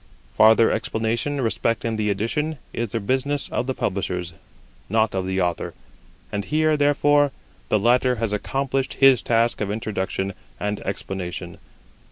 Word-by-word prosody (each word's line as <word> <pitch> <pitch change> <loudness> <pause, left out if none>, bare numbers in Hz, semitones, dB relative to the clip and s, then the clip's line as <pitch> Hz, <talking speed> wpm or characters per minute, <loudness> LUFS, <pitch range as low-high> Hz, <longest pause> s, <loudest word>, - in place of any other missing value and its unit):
Farther 110 +1 +6
explanation 115 +6 -1
respecting 115 -1 0
the 105 -1 0
Edition 150 +10 -1 0.2
is 115 -4 -3
the 115 - 0
business 130 +6 0
of 125 - -2
the 130 - -1
publishers, 90 -3 -2 0.6
not 110 +1 +2
of 95 -1 -2
the 95 0 -1
Author; 90 -2 -1 0.6
and 100 0 -2
here, 155 +5 +2
therefore, 145 0 +3 0.4
the - - +3
latter 125 +4 +3
has 110 -2 -2
accomplished 135 +5 -1
his 135 -2 +6
task 115 0 +1
of 105 - -1
introduction 100 -2 -2 0.3
and 105 0 -2
explanation. 95 -2 -5
115 Hz, 140 wpm, -23 LUFS, 100-135 Hz, 0.6 s, Farther